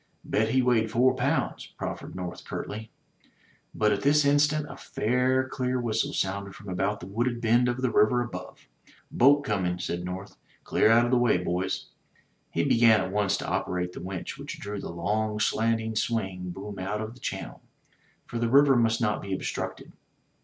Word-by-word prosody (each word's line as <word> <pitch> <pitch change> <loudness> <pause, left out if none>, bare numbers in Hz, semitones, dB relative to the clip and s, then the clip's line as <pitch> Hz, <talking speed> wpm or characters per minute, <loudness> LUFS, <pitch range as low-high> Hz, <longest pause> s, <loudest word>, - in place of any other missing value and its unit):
"Bet 110 +1 +1
he 130 +2 +3
weighed 115 -3 +2
four 125 +4 +3
pounds," 135 +5 -1
proffered - - -5
North 90 -1 -6
curtly. 110 +1 -6 0.9
But 105 -1 +2
at 100 - 0
this 145 +1 +4
instant 150 +1 +3
a 135 - -9
faint 130 +2 0
clear 130 -1 -1
whistle 115 -3 0
sounded 100 +1 -2
from 105 -6 -10
about 95 +3 -1
the - - -7
wooded 120 +5 -1
bend 120 +1 +3
of 125 +1 -3
the 125 - +2
river 120 +3 +4
above. 120 - -9 0.4
Boat 145 +3 +5
coming," 90 -6 -1
said 90 -1 -3
North. 95 +3 -6 0.3
"Clear - - +3
out 115 +1 +6
of 120 - -1
the 125 - +4
way, 120 -6 +3
boys." 90 +2 -2 0.6
He - - 0
began 115 -2 +5
at 95 - -2
once 100 -1 +1
to - - -5
operate 90 0 -2
the - - -8
winch 95 0 -6
which - - -7
drew 100 0 -5
the - - -6
long 105 +5 -1
slanting 110 0 +1
swing 95 -5 -2
boom 100 +2 -7
out 100 +3 -2
of 110 +1 -5
the 125 - -16
channel, - - -5 0.6
for 120 - -5
the 120 0 +1
river 140 +1 +6
must 115 -1 +2
not 105 -3 +1
be 95 -1 -3
obstructed. - - -5
110 Hz, 180 wpm, -27 LUFS, 95-125 Hz, 0.9 s, out